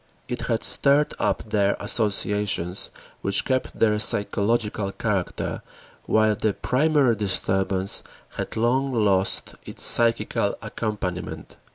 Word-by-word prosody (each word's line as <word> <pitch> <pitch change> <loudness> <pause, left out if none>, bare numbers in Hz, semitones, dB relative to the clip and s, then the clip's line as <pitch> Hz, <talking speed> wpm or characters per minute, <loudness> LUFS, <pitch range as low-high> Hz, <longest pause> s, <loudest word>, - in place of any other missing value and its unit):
It - - -5
had - - -1
stirred 145 +2 +2
up - - -1
there 100 -1 +1
associations 105 -4 0 0.3
which 100 0 +4
kept 130 -1 -2
their 105 -1 +2
psychological 105 -1 +1
character 100 -4 -3 0.5
while 110 0 +3
the 105 -1 -1
primary 140 -2 +2
disturbance 95 -1 +1 0.3
had - - -5
long 130 +4 +1
lost 100 -5 +1
its - - -2
psychical 115 -1 +2
accompaniment. 100 -5 -5
105 Hz, 105 wpm, -23 LUFS, 100-120 Hz, 0.5 s, which